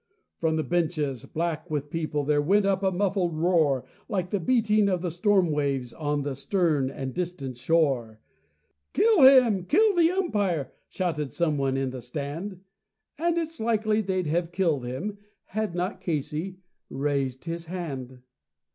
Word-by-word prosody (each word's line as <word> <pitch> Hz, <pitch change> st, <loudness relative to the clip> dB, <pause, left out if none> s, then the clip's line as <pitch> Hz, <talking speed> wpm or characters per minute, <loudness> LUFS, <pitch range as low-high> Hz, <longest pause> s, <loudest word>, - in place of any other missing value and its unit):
From 160 Hz, -1 st, +1 dB
the 155 Hz, -, 0 dB
benches, 155 Hz, -7 st, -1 dB
black 165 Hz, +1 st, -3 dB
with 145 Hz, -1 st, -3 dB
people, 155 Hz, -3 st, -1 dB
there 145 Hz, +1 st, +2 dB
went 195 Hz, +7 st, +3 dB
up 195 Hz, -1 st, +1 dB
a 190 Hz, -, +3 dB
muffled 185 Hz, -3 st, 0 dB
roar, 155 Hz, -6 st, +2 dB, 0.2 s
Like 185 Hz, -3 st, -2 dB
the 205 Hz, -, +1 dB
beating 215 Hz, -1 st, +3 dB
of 180 Hz, -3 st, 0 dB
great 175 Hz, -3 st, -2 dB
storm 185 Hz, -1 st, +3 dB
waves 140 Hz, -4 st, -1 dB
on 145 Hz, -2 st, -2 dB
a 145 Hz, -, -2 dB
stern 150 Hz, -2 st, +1 dB
and 135 Hz, -1 st, -5 dB
distant 170 Hz, -8 st, -4 dB
shore. 130 Hz, -9 st, +1 dB, 0.7 s
"Kill 440 Hz, -7 st, +4 dB
him! 250 Hz, -8 st, +7 dB
Kill 420 Hz, -, +4 dB
the 335 Hz, -1 st, +5 dB
umpire!" 205 Hz, -, 0 dB, 0.2 s
shouted 160 Hz, -6 st, -2 dB
someone 140 Hz, -5 st, 0 dB
on 135 Hz, -1 st, -1 dB
the 130 Hz, -1 st, -7 dB
stand. 150 Hz, -, -5 dB, 0.6 s
And 340 Hz, +1 st, +1 dB
it's 325 Hz, -1 st, -3 dB
likely 220 Hz, -1 st, +1 dB
they'd 185 Hz, -3 st, -1 dB
have 165 Hz, +2 st, -1 dB
killed 165 Hz, -8 st, 0 dB
him 200 Hz, +12 st, -4 dB, 0.3 s
had 215 Hz, -3 st, -3 dB
not 180 Hz, +3 st, -2 dB
Casey 155 Hz, +3 st, -3 dB, 0.3 s
raised 135 Hz, 0 st, -2 dB
a 165 Hz, +1 st, -2 dB
hand. 135 Hz, -8 st, -6 dB
170 Hz, 155 wpm, -26 LUFS, 145-195 Hz, 0.7 s, him